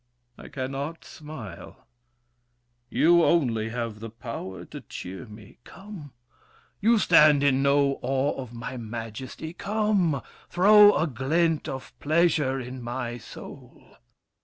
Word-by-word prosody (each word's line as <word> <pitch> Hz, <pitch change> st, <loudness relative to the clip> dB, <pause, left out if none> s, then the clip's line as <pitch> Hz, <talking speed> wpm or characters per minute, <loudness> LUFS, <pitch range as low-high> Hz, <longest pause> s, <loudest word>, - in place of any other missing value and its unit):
I -, -, -12 dB
cannot 140 Hz, +4 st, -5 dB
smile. 110 Hz, -, -10 dB, 1.0 s
You, 170 Hz, +1 st, +4 dB
only, 120 Hz, -11 st, +2 dB
have 115 Hz, -2 st, -4 dB
the 115 Hz, +1 st, -7 dB
power 115 Hz, -5 st, -7 dB
to -, -, -9 dB
cheer 95 Hz, +7 st, -8 dB
me. 105 Hz, -1 st, -14 dB
Come! 190 Hz, -7 st, -11 dB, 0.7 s
You 225 Hz, +3 st, +4 dB
stand 150 Hz, -7 st, +5 dB
in 135 Hz, -1 st, +3 dB
no 140 Hz, 0 st, +2 dB
awe 135 Hz, +2 st, 0 dB
of 125 Hz, -3 st, -9 dB
my 125 Hz, +2 st, -6 dB
majesty. 120 Hz, +7 st, -7 dB
Come, 200 Hz, -7 st, 0 dB, 0.3 s
throw 205 Hz, +3 st, +7 dB
a 160 Hz, -, +2 dB
glint 155 Hz, +4 st, 0 dB
of 130 Hz, 0 st, -7 dB
pleasure 150 Hz, -4 st, +2 dB
in 130 Hz, 0 st, -7 dB
my 120 Hz, 0 st, -4 dB
soul. 110 Hz, -, -13 dB
135 Hz, 120 wpm, -26 LUFS, 120-165 Hz, 1.0 s, throw